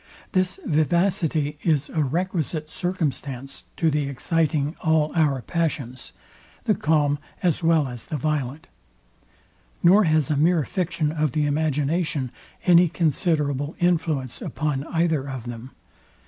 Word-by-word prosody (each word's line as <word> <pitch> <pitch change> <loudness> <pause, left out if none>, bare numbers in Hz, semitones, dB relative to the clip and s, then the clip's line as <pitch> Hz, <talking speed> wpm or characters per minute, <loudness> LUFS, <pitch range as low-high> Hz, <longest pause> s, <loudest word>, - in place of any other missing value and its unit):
This 185 -1 +1
vivacity 160 -2 +1
is 155 -3 +1
a 160 - -1
requisite 160 0 -2
circumstance 140 -7 -3
to 165 -2 +2
the 150 -1 0
exciting 150 +2 0
all 160 -2 +2
our 145 -6 +1
passions, 145 -7 -3 0.5
the - - +3
calm 145 -2 +1 0.2
as 175 -1 +1
well 165 -3 +3
as 120 -3 -6
the 155 - -3
violent; 145 0 -2 1.2
nor 190 +4 +6
has 155 -3 +2
a - - +2
mere 160 +2 +3
fiction 165 -1 -1
of 155 -4 -1
the 150 -1 +1
imagination 150 -1 0 0.3
any 175 -1 +6
considerable 150 -3 0
influence 160 -7 0
upon 145 -2 -2
either 160 -5 0
of 130 -3 -5
them. 120 +1 -7
155 Hz, 125 wpm, -24 LUFS, 140-165 Hz, 1.2 s, nor